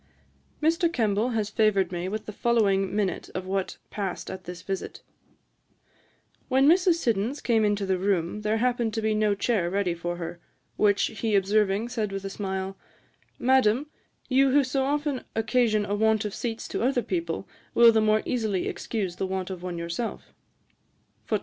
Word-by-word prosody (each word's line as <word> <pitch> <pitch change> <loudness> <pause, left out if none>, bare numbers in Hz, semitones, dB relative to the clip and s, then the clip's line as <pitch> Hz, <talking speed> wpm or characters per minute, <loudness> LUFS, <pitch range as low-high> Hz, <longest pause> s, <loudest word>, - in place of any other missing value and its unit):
Mr. 330 +2 +3
Kemble 220 -4 +1
has 210 -1 -1
favoured 205 -5 +2
me 175 +1 -3
with 215 +1 -4
the - - -6
following 200 -4 +2
minute 200 -3 -1
of 185 0 -3
what 190 0 -2
passed 195 -4 -4
at 185 -1 -8
this 175 -1 -8
visit: 195 -1 -5 1.5
'When 265 +1 +4
Mrs. 355 +1 +5
Siddons 235 -2 -1
came 225 -3 +2
into 205 -1 +1
the 190 -1 0
room, 190 0 0
there 215 +1 +1
happened 240 -2 0
to 225 - -1
be 220 0 +2
no 215 -1 +2
chair 200 -4 0
ready 195 -1 0
for 175 +1 -4
her, 170 0 -6 0.4
which 205 -1 +3 0.2
he 220 -1 +1
observing, 200 +2 +2
said 220 -5 -2
with 195 0 -5
a 195 - -4
smile, 190 -1 -3 0.6
"Madam, 260 +2 +2 0.4
you 270 +1 +4
who 285 +2 +4
so 265 +1 0
often 290 -1 -1
occasion 225 -2 +2
a 205 - -2
want 220 0 +2
of 210 - -3
seats 230 -1 -4
to - - -3
other 250 0 +1
people, 170 -3 -3 0.3
will 235 -1 +8
the 220 -1 +3
more 215 0 +3
easily 220 -7 -1
excuse 190 -6 -3
the 190 - -1
want 190 0 -3
of 185 -2 -6
one 180 -1 -4
yourself." 170 +7 -4
210 Hz, 170 wpm, -26 LUFS, 190-235 Hz, 1.5 s, will